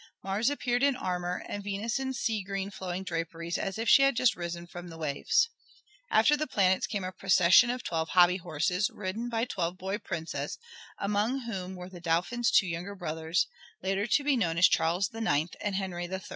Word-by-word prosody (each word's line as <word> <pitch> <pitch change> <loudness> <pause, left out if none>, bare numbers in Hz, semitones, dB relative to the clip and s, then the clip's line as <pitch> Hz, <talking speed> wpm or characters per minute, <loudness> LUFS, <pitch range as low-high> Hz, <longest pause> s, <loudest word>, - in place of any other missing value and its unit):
Mars 200 +6 +1
appeared 245 -4 -1
in 280 -1 +3
armor, 180 -4 -3
and 205 - -5
Venus 205 +4 -2
in 265 0 -2
sea 225 -4 -1
green 195 +1 -4
flowing 190 -1 -5
draperies 165 -1 -4
as 195 0 -3
if 225 +1 -3
she - - +7
had 275 -1 +4
just 235 -2 +3
risen 170 0 -5
from 175 0 -9
the 165 -1 -10
waves. 160 - +1 0.6
After 295 - +5
the 305 +1 -2
planets 190 -5 +2
came 205 -3 -3
a 185 - -3
procession 185 +4 +5
of 250 0 -2
twelve 160 -1 -2
hobby 180 0 +5
horses, 180 +3 0
ridden 210 +4 -4
by 230 0 0
twelve 175 -6 -3
boy 190 +3 -3
princes, 170 -6 -4 0.4
among 210 +6 0
whom 190 -6 -5
were 180 0 -8
the 180 -2 -11
Dauphin's 175 +9 +1
two - - +5
younger 180 +3 -4
brothers, 160 -1 -1 0.4
later 195 +3 0
to 285 - +2
be 285 -1 +3
known 170 -9 0
as 180 - +7
Charles 170 +3 +1
IX 200 -8 0
and 205 -2 -1
Henry 185 -3 -3
III. 190 +1 -4
190 Hz, 195 wpm, -29 LUFS, 175-225 Hz, 0.6 s, she